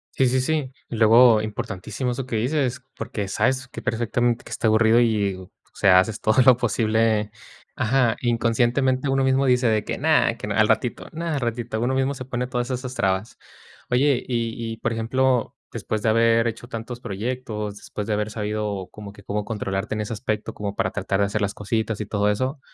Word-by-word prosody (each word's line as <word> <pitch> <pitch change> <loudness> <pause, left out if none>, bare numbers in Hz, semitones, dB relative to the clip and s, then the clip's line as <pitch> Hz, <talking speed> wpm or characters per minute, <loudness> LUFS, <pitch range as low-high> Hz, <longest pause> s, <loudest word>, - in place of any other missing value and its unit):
Sí 130 - +3
sí 130 +1 +2
sí. 145 -1 -1 0.2
Y, - - -4
luego, 115 0 +6
importantísimo 110 +2 -4
eso 130 +1 -4
que 120 - -3
dices, 130 +1 -1
porque 115 -3 -4
sabes 130 +6 0
que 125 - -9
perfectamente 120 +1 0
que - - -13
está - - -1
aburrido, 110 +1 +4
y, 105 -4 +2
o 95 -1 -11 0.2
sea, 95 -2 +5
haces 110 +2 -1
todo 110 +3 +2
lo 130 0 +7
posible. 110 -2 +1 0.4
Ajá, 120 0 +2
inconscientemente 120 +3 +1
uno 135 0 +2
mismo 135 +1 +2
dice 125 0 +3
de 110 -1 +1
que: - - -4
"No, - - -3 0.3
que - - -6
no - - -2
al - - +4
ratito, - - 0
no 165 +2 -4
al 155 -4 -1
ratito". 120 -2 -3
Uno 130 +2 0
mismo 135 +1 +1
se 130 -2 -7
pone 125 -1 -2
todas 125 0 -3
esas 130 0 -4
trabas. 95 -1 -1 0.5
Oye, 130 +1 +2
y 115 -1 -2
y - - -9
por 115 - -2
ejemplo, 125 +2 0 0.2
después 110 -1 -3
de 110 - +3
haber 115 +1 +4
hecho 115 +1 -5
tantos 120 +1 -6
proyectos, 105 -2 -4
después 105 - -6
de 110 - -1
haber 105 +1 -1
sabido 105 -3 -3
como 105 -1 -10
que 100 -1 -15
cómo 105 +1 -2
controlarte 105 -1 -3
en 105 - -2
ese 105 +2 -4
aspecto, 110 -1 -3
como 100 -1 -5
para - - 0
tratar 100 0 -1
de - - +4
hacer 100 +2 -2
las 100 0 -1
cositas 110 +1 -2
y - - -3
todo 105 0 0
eso. 130 +7 -1
115 Hz, 205 wpm, -23 LUFS, 105-125 Hz, 0.5 s, lo